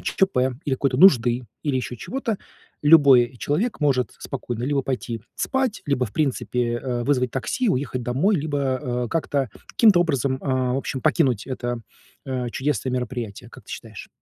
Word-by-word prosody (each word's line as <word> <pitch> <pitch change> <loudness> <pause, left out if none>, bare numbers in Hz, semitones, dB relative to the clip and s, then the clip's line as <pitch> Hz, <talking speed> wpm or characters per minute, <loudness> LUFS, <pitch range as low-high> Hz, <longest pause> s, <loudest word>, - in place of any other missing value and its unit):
ЧП 130 -9 0
или 140 - 0
какой-то 135 0 0
нужды, 125 -7 +5 0.2
или 145 -3 0
ещё 125 -1 -3
чего-то, 230 - -3 0.4
любой 140 -5 +6
человек 165 - -1
может 135 -4 +1
спокойно 120 -4 -5
либо 140 +1 0
пойти 120 -4 -3
спать, 265 -5 -1
либо, 130 -4 +1
в 105 - -13
принципе, 125 -5 0
э, 120 0 -2
вызвать 125 -3 +1
такси, 135 - -1
уехать 130 -5 -1
домой, 145 - +2
либо, 150 -2 -2
э, 130 -3 -1
как-то, 140 -6 -1 0.2
каким-то 210 -6 +5
образом, 140 -6 +1
э, - - -12
в 130 -1 +1
общем, 135 -1 -3
покинуть 130 -6 +1
это, 120 -2 -3 0.4
э, 130 -2 -3
чудесное 130 -1 -1
мероприятие, 120 -4 -4
как - - -14
ты - - -9
считаешь? - - -9
130 Hz, 160 wpm, -23 LUFS, 125-145 Hz, 0.4 s, любой